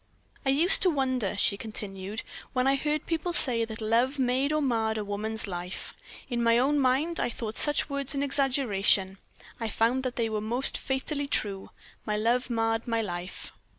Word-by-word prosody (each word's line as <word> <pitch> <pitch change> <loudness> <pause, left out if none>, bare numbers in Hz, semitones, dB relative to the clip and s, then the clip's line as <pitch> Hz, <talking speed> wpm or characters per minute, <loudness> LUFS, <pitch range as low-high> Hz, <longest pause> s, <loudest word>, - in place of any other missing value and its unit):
"I 270 - 0
used 315 +8 +5
to 370 - +6
wonder," 260 - -1
she 200 0 +2
continued, 205 -1 -6 0.3
"when 255 0 +1
I 270 - +4
heard 300 +2 -1
people 335 +1 -2
say 235 -8 +3
that 225 0 -8
love 235 +6 +1
made 260 +2 +1
or 305 - +1
marred 225 -6 0
a 210 - -3
woman's 215 +2 -2
life. 180 -1 -6 0.3
In 240 -2 -2
my 230 0 +4
own 280 +4 +2
mind 280 +6 +1
I - - 0
thought 225 -2 -6
such 295 -1 +3
words 280 -1 -2
an 280 - 0
exaggeration. 225 -9 +1 0.4
I 225 -1 -2
found 230 +5 +1
that 255 -1 -4
they 230 -2 0
were 215 -1 -3
most 240 +5 +3
fatally 280 +2 -2
true 200 -7 -2 0.3
my 210 -1 -2
love 240 +4 +1
marred 225 0 -1
my 230 -1 0
life. 175 -1 -7
235 Hz, 185 wpm, -27 LUFS, 215-275 Hz, 0.4 s, to